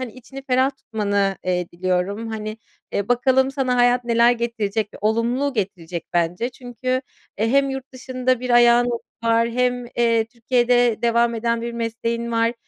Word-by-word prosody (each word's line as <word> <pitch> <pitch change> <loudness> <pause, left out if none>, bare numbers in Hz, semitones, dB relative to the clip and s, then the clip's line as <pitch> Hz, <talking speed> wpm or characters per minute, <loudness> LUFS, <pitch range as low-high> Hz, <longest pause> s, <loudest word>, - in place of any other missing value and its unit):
hani, 250 -4 -5
içini 270 +2 -11
ferah 260 0 +2
tutmanı, 205 -5 -1
eee, 180 -1 0
diliyorum. 185 +5 -1
Hani, 215 -1 -5 0.4
eee, 200 0 -2
bakalım 260 +2 +3
sana 265 -2 0
hayat 245 0 +3
neler 235 0 +4
getirecek? 225 -3 -2
Olumlu 235 +6 0
getirecek 180 -6 -4
bence 175 +7 0
çünkü 250 0 -9 0.5
eee, 220 +2 +1
hem 275 +1 +3
yurt 270 0 -6
dışında 255 -1 -1
bir 250 0 -4
ayağın 240 0 +6 0.4
var 230 0 +3
hem, 245 0 0
eee, 230 -1 +3
Türkiye'de 240 0 +1
devam 235 0 +2
eden 230 0 -1
bir 235 - -4
mesleğin 230 0 -3
var. 230 0 +2
235 Hz, 150 wpm, -22 LUFS, 220-250 Hz, 0.5 s, ayağın